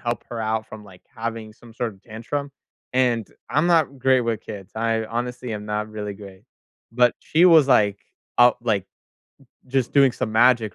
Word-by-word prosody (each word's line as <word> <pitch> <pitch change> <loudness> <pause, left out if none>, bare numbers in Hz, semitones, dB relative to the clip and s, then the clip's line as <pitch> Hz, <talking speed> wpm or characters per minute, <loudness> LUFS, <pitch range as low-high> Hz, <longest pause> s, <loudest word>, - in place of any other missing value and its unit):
help 120 0 -3
her 120 -1 -4
out 110 0 -2
from, 110 -1 -11
like, 95 -3 -16
having 115 -1 -5
some 115 +1 -17
sort 115 -1 -3
of 95 - -25
tantrum, 120 +6 -5 0.4
and 120 -4 +1 0.2
I'm 150 +4 +2
not 160 -6 +2
great 130 0 +3
with 115 -2 -2
kids, 100 -4 -10
I 115 0 0
honestly 120 +1 -4
am 105 -1 -6
not 105 0 -2
really 105 -1 -5
great, 100 -1 -13 0.5
but 120 0 +3
she 165 +3 +2
was, 160 -6 +6
like, 105 -6 +3 0.4
up 120 0 +6
like, 105 -5 0 0.8
just 130 -1 -1
doing 135 -3 +5
some 125 -2 -3
magic 115 -2 +3
115 Hz, 180 wpm, -23 LUFS, 110-125 Hz, 0.8 s, was